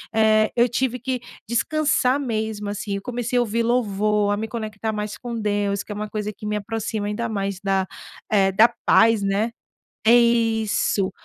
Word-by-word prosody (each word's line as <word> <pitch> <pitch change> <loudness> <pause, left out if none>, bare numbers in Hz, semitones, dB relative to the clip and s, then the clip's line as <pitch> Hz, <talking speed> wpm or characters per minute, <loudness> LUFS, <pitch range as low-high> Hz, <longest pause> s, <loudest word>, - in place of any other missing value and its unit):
eh, 215 0 +4
eu 240 0 +4
tive 250 0 -1
que 255 +1 -2 0.3
descansar 280 +1 +2
mesmo, 220 -5 -3
assim. 205 0 -3
Eu 200 - -4
comecei 245 +1 -2
a - - +4
ouvir 230 0 0
louvor, 210 -3 +1
a - - -1
me 220 +1 -3
conectar 220 -1 -4
mais 210 0 -4
com 240 -1 -6
Deus, 205 -2 -1
que - - -11
é - - -4
uma 210 0 -4
coisa 210 -1 -3
que 210 - -11
me 210 0 -1
aproxima 215 0 -3
ainda 235 +3 -2
mais, 200 -3 -3
da, 195 -1 +1 0.5
eh, 195 -2 +3 0.3
paz 225 -2 +5
né 200 +4 0 0.6
isso, 225 -4 +3
215 Hz, 170 wpm, -23 LUFS, 205-235 Hz, 0.6 s, paz